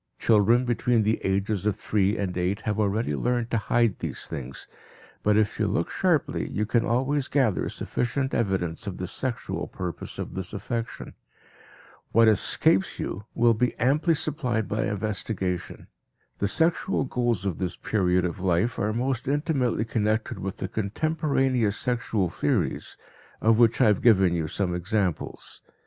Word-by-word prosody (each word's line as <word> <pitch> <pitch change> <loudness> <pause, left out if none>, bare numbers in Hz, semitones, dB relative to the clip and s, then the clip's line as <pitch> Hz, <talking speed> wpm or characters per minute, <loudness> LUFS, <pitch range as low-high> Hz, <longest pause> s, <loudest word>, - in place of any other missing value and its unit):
Children 115 +3 +4
between 120 -1 +2
the 110 +2 0
ages 100 +1 0
of 105 - +1
three 105 0 0
and 95 -3 -2
eight 90 +3 -1
have 105 +1 -2
already 105 -5 0
learned 120 - -1
to 115 - +2
hide 115 0 +1
these - - -4
things, 65 0 -6 0.5
but 105 0 +3
if 110 -2 +1
you - - +2
look - - -1
sharply - - 0
you 105 - -1
can 115 +2 +2
always 130 +4 0
gather 130 -9 +1
sufficient 135 +2 -2
evidence 95 -4 -1
of 95 - -4
the 90 - -3
"sexual" 120 +6 -3
purpose 90 -2 -6
of - - -5
this 95 0 -5
affection. 115 +3 -4 1.0
What 115 +1 +6
escapes 95 -2 +3
you 100 +3 -4
will 120 0 +4
be 120 +2 0
amply 150 +7 +2
supplied 130 -8 -1
by 110 - -1
investigation. 100 -3 -3 0.5
The 100 - +1
sexual 165 - +1
goals 120 -6 -1
of 95 -5 -2
this 90 -2 -2
period 90 -4 +1
of 90 +1 -3
life 95 +5 +1
are 105 +1 0
most 125 +1 -1
intimately 140 -5 0
connected 110 -1 -1
with 95 0 -4
the - - -3
contemporaneous 130 - 0
sexual 115 -6 0
theories, - - -1 0.4
of 110 +1 +3
which 115 -2 +4
I 130 - +5
have 105 -3 +3
given 95 -7 +5
you 80 -2 -1
some 90 +2 -1
examples. 90 +1 -2
110 Hz, 155 wpm, -26 LUFS, 95-120 Hz, 1.0 s, What